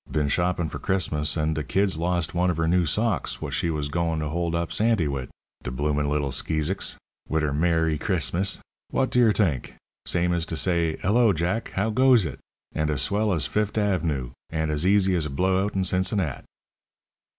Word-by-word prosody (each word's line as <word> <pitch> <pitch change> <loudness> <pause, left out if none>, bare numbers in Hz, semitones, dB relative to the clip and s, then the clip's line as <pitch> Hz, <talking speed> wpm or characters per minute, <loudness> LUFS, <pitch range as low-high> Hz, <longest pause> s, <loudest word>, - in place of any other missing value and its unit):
Been 75 -2 0
shoppin' 85 +1 0
for - - -6
Chrismus, 80 -5 0
and 80 0 +1
de 80 -1 -2
kid's 95 +3 +1
lost 85 -1 0
one 90 +1 +2
of 85 - -1
her 80 0 +1
new 90 0 +2
socks 105 +5 0
w'ot - - -6
she 85 - 0
was 75 -3 -2
goin' 85 +1 -1
to 75 -1 -2
hold 85 +1 -1
up 85 0 -2
Santy 110 -7 +2
wid. 70 -3 -4 0.3
De - - -5
bloomin' 75 +2 -1
little 70 -2 0
skeezicks! 75 +3 -1 0.3
Wit' 80 0 +1
her 75 -2 0
'Mer 80 +2 +2
ry 80 -1 0
Chris 80 - -1
mus!' 95 +3 0 0.3
W'ot 130 - 0
d' - - 0
yer 115 -3 +6
t'ink! 85 - 0 0.3
Same 90 0 +1
as 85 -1 -1
to 80 - -4
say, 85 -2 +1
'Hello, 110 +1 +4
Jack, 90 +8 -2
how 105 +4 +1
goes 125 -3 +5
it?' 75 - -6 0.3
and 75 -1 -1
as 70 -2 +1
swell 105 +5 +1
as 80 -7 +1
Fift' 105 0 -1
Av'noo, 85 - 0 0.2
and 80 -1 -1
as 75 +4 0
easy 95 -1 +4
as 80 -3 0
a - - -7
blowout 95 +7 0
in 95 - +1
Cincinnat." 95 - 0
85 Hz, 205 wpm, -25 LUFS, 75-95 Hz, 0.3 s, yer